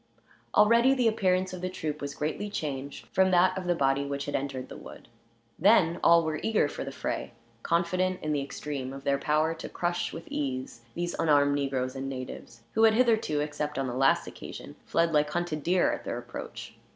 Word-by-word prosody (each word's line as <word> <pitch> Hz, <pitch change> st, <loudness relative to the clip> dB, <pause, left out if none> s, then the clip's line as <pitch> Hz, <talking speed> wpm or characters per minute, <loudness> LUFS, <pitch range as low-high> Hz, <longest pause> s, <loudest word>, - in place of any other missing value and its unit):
Already 235 Hz, +5 st, +5 dB
the 250 Hz, -3 st, +2 dB
appearance 185 Hz, -4 st, +1 dB
of 180 Hz, -, -6 dB
the 185 Hz, -, -2 dB
troop 155 Hz, -4 st, -4 dB
was 140 Hz, 0 st, -5 dB
greatly 160 Hz, +7 st, -3 dB
changed 140 Hz, -7 st, -5 dB
from 190 Hz, 0 st, +4 dB
that 185 Hz, +1 st, +4 dB
of 185 Hz, -1 st, -4 dB
the 175 Hz, -, +2 dB
body 135 Hz, -2 st, +2 dB
which 140 Hz, 0 st, -3 dB
had 145 Hz, -, -4 dB
entered 135 Hz, -2 st, -3 dB
the -, -, -10 dB
wood. -, -, -11 dB, 0.5 s
Then 175 Hz, -3 st, +4 dB
all 170 Hz, 0 st, +6 dB
were 155 Hz, -1 st, -2 dB
eager 220 Hz, -8 st, +2 dB
for -, -, -5 dB
the -, -, -6 dB
fray; -, -, -4 dB, 0.3 s
confident 180 Hz, +4 st, 0 dB
in 155 Hz, -, -1 dB
the 145 Hz, -2 st, +1 dB
extreme 140 Hz, -1 st, -5 dB
of 135 Hz, 0 st, -9 dB
their 140 Hz, 0 st, +1 dB
power 155 Hz, +3 st, +1 dB
to 165 Hz, -, -8 dB
crush, 175 Hz, 0 st, -2 dB
with 165 Hz, -, -8 dB
ease, 130 Hz, -4 st, -4 dB
these 175 Hz, 0 st, -2 dB
unarmed 145 Hz, -2 st, +4 dB
negroes 135 Hz, -2 st, -1 dB
and 135 Hz, 0 st, -4 dB
natives, 130 Hz, -3 st, -8 dB
who 220 Hz, -, +1 dB
had 220 Hz, -1 st, +5 dB
hitherto, 220 Hz, -11 st, +2 dB
except 150 Hz, -1 st, -3 dB
on 135 Hz, -, 0 dB
the 125 Hz, -, -3 dB
last 135 Hz, +2 st, +3 dB
occasion, -, -, -9 dB
fled 165 Hz, 0 st, +2 dB
like 150 Hz, 0 st, +3 dB
hunted 175 Hz, -2 st, -2 dB
deer 180 Hz, +4 st, +2 dB
at -, -, -5 dB
their -, -, -3 dB
approach. -, -, -8 dB
155 Hz, 200 wpm, -28 LUFS, 140-185 Hz, 0.5 s, all